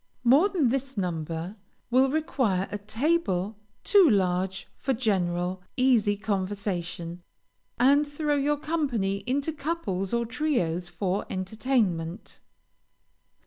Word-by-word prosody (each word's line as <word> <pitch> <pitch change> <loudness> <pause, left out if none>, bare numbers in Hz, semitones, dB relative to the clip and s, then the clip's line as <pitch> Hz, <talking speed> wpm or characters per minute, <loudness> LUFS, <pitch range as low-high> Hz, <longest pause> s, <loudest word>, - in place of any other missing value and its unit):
More 280 +11 +5
than 325 -11 +2
this 270 0 -2
number 170 +1 -3 0.3
will 260 +2 +5
require 260 -11 0
a 205 - -3
table 215 - 0 0.2
too 390 -6 +6
large 190 -2 0
for 270 - -1
general, 185 -5 0 0.2
easy 235 -6 +3
conversation, 185 -4 -3 0.6
and 285 +4 +5
throw 295 +1 -1
your 290 +1 +1
company 270 -11 -1
into 280 +5 0
couples 275 - -3
or 235 0 +1
trios, 200 - -1
for 195 +1 -2
entertainment. 190 -3 -1
215 Hz, 105 wpm, -27 LUFS, 185-275 Hz, 0.6 s, too